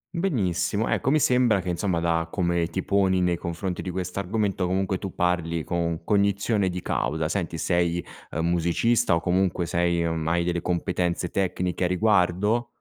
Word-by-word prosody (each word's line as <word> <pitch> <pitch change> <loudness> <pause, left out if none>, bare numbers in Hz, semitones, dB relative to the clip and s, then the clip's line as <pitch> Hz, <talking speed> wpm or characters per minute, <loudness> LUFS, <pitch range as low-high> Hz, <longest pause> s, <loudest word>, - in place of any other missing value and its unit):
Benissimo. 110 - 0
Ecco, - - 0
mi 155 +3 +4
sembra 125 -6 +3
che 90 -1 -4
insomma, 90 0 0
da 85 -1 0
come 85 -2 0
ti 95 - -4
poni 95 -2 +2
nei 90 -1 +2
confronti 85 +2 -4
di - - -5
questo 90 +1 -4
argomento, 100 -1 -1
comunque 95 0 0
tu 95 - -6
parli 85 -2 0
con 85 -1 -2
cognizione 100 +1 +1
di 90 0 -5
causa. 80 +1 -1
Senti, 85 -2 -2
sei, 85 0 0 0.2
ehm, 80 +2 -2
musicista 85 +6 +2
o - - +1
comunque 90 0 0
sei 85 0 +1
o, 80 - 0
mhmm, 80 -1 -3
hai 85 +1 +1
delle 85 -1 -1
competenze 90 -1 -1
tecniche 90 -1 -1
a - - +2
riguardo? 105 +4 +2
90 Hz, 175 wpm, -25 LUFS, 85-100 Hz, 0.2 s, mi